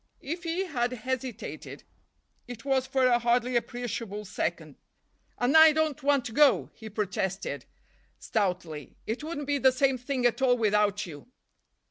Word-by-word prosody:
If 340 +5 -5
he 340 +4 -1
had 250 -7 -1
hesitated, 255 0 -5 0.6
it 245 0 -9
was 265 -1 +1
for 265 -1 +2
a 240 -1 +4
hardly 240 +1 +1
appreciable 230 -3 -3
second. 190 - -4 0.6
"And 245 +5 +1
I 315 -1 +9
don't 315 -2 0
want 280 -2 +2
to - - -5
go," 290 +4 +4
he 220 -1 -10
protested 195 -2 -3 0.5
stoutly, 180 - -3
"it 230 +6 -3
wouldn't 305 -2 -4
be 285 0 0
the 260 0 +5
same 260 0 +1
thing 250 0 -2
at 245 +2 +2
all 250 -2 +4
without 210 -2 +2
you." 150 -1 -10
245 Hz, 150 wpm, -28 LUFS, 215-275 Hz, 0.6 s, I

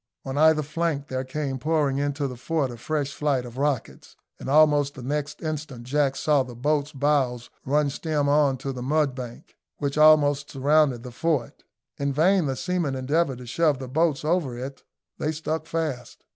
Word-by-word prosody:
On 135 0 -4
either 155 +1 +4
flank 150 -2 -2
there 130 0 -2
came 135 0 -3
pouring 145 -1 +1
into 145 0 -1
the 125 - -6
fort 140 +1 -1
a 120 - -8
fresh 140 +3 -2
flight 140 -5 0
of 120 +2 -9
rockets, 140 -4 -2 0.2
and - - -6
almost 145 -1 +4
the 130 - -9
next 145 +4 -3
instant 150 -6 -4
Jack 140 +2 +1
saw 150 -3 +2
the 125 -2 -6
boats' 145 +3 0
bows 135 -4 0 0.2
run 145 +2 +2
stem 150 -1 -1
on 145 -2 +3
to 135 +2 -4
the 125 - -6
mudbank, 130 -3 -2 0.2
which 140 0 -2
almost 145 -2 +5
surrounded 140 -3 +2
the 125 - -8
fort. 145 -1 -2 0.4
In 140 0 0
vain 170 +4 +3
the 135 - -1
seamen 175 -3 -1
endeavoured 135 +1 0
to 125 - -10
shove 150 +4 +1
the 130 0 -7
boats 155 +2 +1
over 155 -7 0
it 135 +2 -7 0.4
they 155 - 0
stuck 160 +1 -3
fast. 155 -7 -4
145 Hz, 180 wpm, -25 LUFS, 130-155 Hz, 0.4 s, almost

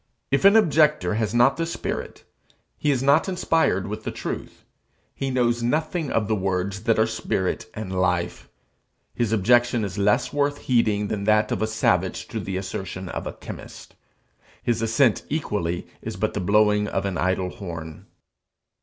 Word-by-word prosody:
If 140 +7 +2
an 200 +2 +8
objector 150 - +4
has 110 -1 0
not 120 +3 +4
this 165 0 -2
spirit, - - -5 0.6
is 140 -4 +1
not 140 +7 +4
inspired 165 - +1
with 105 +2 -5
the - - -3
truth, - - -6 0.5
he 135 - -3
knows 120 -2 +1
nothing 155 +5 -1
of 105 -2 +1
the 110 - +1
words 95 +1 -2
that 115 -2 +3
are 110 - +4
spirit 110 -2 -2
and 110 -4 -5
life; 90 -2 0
and - - -24 0.7
his 115 -3 +1
objection 120 +2 +3
is 100 0 -5
less 105 +6 +2
worth 145 0 +1
heeding 110 -5 +1
than 100 -1 -3
that 105 0 +3
of - - -1
a 110 - +1
savage 95 -4 0
to 115 - -4
the 95 -2 -4
assertion 95 -1 -5
of - - -5
a - - -5
chemist. - - -10 0.7
His 120 -2 0
assent 115 +2 +3
equally 105 - -2 0.2
is - - -5
but 110 +4 -1
the - - -2
blowing 105 +2 +3
of - - -2
an 95 -4 -2
idle 95 0 0
horn. 80 -5 -8
110 Hz, 170 wpm, -24 LUFS, 95-125 Hz, 0.7 s, an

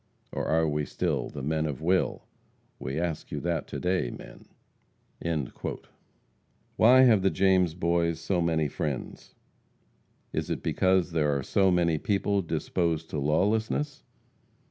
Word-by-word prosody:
Or - - -3
are 80 0 +2
we 75 0 -1
still, - - -2
The 70 - -7
men 80 +2 0
of 70 -4 -4
will? 90 +4 0 0.5
We 65 +4 -3
ask 85 -3 -3
you - - -3
that 85 -1 -2
to - - -5
day, 90 -8 0
men!" - - -11 2.3
Why 125 +4 +7
have 115 -6 +6
the 95 - +3
James 95 -4 +2
Boys 85 -1 0
so 90 +1 0
many 80 -2 +1
friends? 70 -2 -5 1.0
Is - - -2
it - - -3
because 95 -1 +2
there 75 -3 +1
are 70 - -3
so 95 +6 +2
many 85 -3 +2
people 100 +1 0
disposed 85 -2 -2
to 75 - -2
lawlessness? 110 - 0
85 Hz, 140 wpm, -28 LUFS, 80-95 Hz, 2.3 s, Why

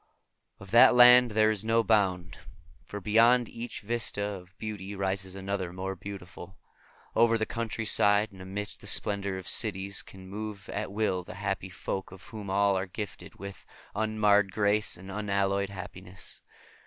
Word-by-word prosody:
Of 100 -1 -12
that 120 +1 +7
land 125 0 +8
there 110 0 +3
is 105 -2 -2
no 115 +1 +2
bound, 95 -6 +1 0.4
for 105 - -7
beyond 115 +4 +4
each 115 +2 -7
vista 110 -1 -2
of 95 -2 -6
beauty 105 -2 -6
rises 95 -1 -2
another 95 -2 -3
more 95 +1 -4
beautiful. 95 -1 -10 0.6
Over 115 0 +4
the 110 - -1
countryside 110 -2 +2
and 95 -1 -13
amidst 100 +2 -6
the - - -10
splendor 100 -2 +1
of 95 - -8
cities 95 +1 0
can 95 -1 -13
move 105 0 -7
at 105 -1 -4
will 100 -3 0
the 90 - -10
happy 95 -1 -3
folk, 95 +1 -5
of 95 0 -12
whom 105 -3 -8
all 100 0 +3
are 95 +1 -2
gifted 105 +2 -7
with 100 0 -9 0.3
unmarred 105 -2 +2
grace 105 -1 +1
and 95 +2 -10
unalloyed 100 -1 0
happiness. 90 0 -8
100 Hz, 155 wpm, -29 LUFS, 95-110 Hz, 0.6 s, land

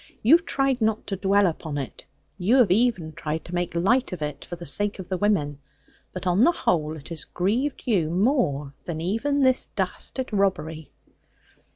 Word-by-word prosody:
You 240 +8 +6
have 345 +2 0
tried 270 -2 +1
not 220 0 +1
to 195 - -3
dwell 200 +1 +3
upon 160 -3 -2
it; 135 -2 -6 0.3
you 200 +8 +3
have 245 -8 +5
even 190 -7 +2
tried 155 +1 -4
to 175 - -9
make 175 -1 -2
light 230 +10 +2
of 180 -4 -4
it 150 -1 -5
for 175 - -6
the 170 0 -9
sake 205 +9 0
of 190 -2 -8
the 185 - -1
women: 150 -9 +1 0.5
but 185 - -7
on 180 +5 +3
the 340 - +6
whole 160 - 0
it 150 - -11
has 165 -2 -4
grieved 235 +10 -1
you 185 -10 +1
more 175 - +1
than 165 -2 -4
even 230 - 0
this 260 -1 +3
dastard 260 -4 -2
robbery.' 180 -6 -1
185 Hz, 190 wpm, -25 LUFS, 160-230 Hz, 0.5 s, You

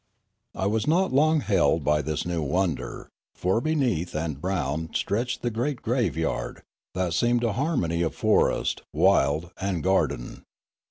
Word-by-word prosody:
I 95 - -2
was 110 +4 0
not 180 +3 +2
long 155 +3 +4
held 95 - +2
by 75 +2 +2
this 75 +1 -3
new 85 -2 -1
wonder, 85 +2 -2 0.2
for 95 +6 0
beneath 125 - 0
and 75 -3 -3
around 80 -4 -2
stretched 120 +5 -1
the 120 - 0
great 120 +4 -2
graveyard, 110 - -1 0.3
that 90 -2 -1
seemed 120 +7 +2
a 115 -3 +1
harmony 115 - 0
of 80 - -1
forest, - - +1
wild, 75 +5 +2
and 95 -5 -1
garden. - - 0
95 Hz, 145 wpm, -26 LUFS, 80-120 Hz, 0.3 s, long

